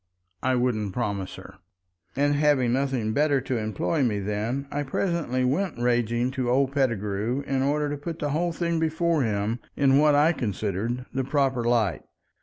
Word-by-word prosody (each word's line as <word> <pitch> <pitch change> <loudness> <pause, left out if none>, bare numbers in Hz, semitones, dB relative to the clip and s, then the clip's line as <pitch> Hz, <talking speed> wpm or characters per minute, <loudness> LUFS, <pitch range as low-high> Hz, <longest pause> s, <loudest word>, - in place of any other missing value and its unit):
I 130 0 +1
wouldn't 110 -6 0
promise 100 -6 -3
her. - - -12 0.6
And—having 145 -3 +2
nothing 130 -5 0
better 145 0 +3
to 125 -2 -2
employ 110 - -1
me 115 -6 +1
then—I 115 +8 -2
presently 145 -3 -1
went 155 +8 0
raging 120 0 +1
to 130 -2 -2
old 135 +2 +2
Pettigrew 115 -2 -1
in 135 -1 0
order 145 +2 +1
to 145 0 -3
put 165 +1 -5
the 145 -1 -2
whole 170 +4 0
thing 170 0 -1
before 160 0 +1
him 110 0 -1 0.2
in 135 -1 +4
what 150 -1 +5
I 150 +4 +4
considered 110 - -2
the 135 +1 0
proper 135 -2 +1
light. 115 -7 +1
130 Hz, 160 wpm, -26 LUFS, 115-145 Hz, 0.6 s, what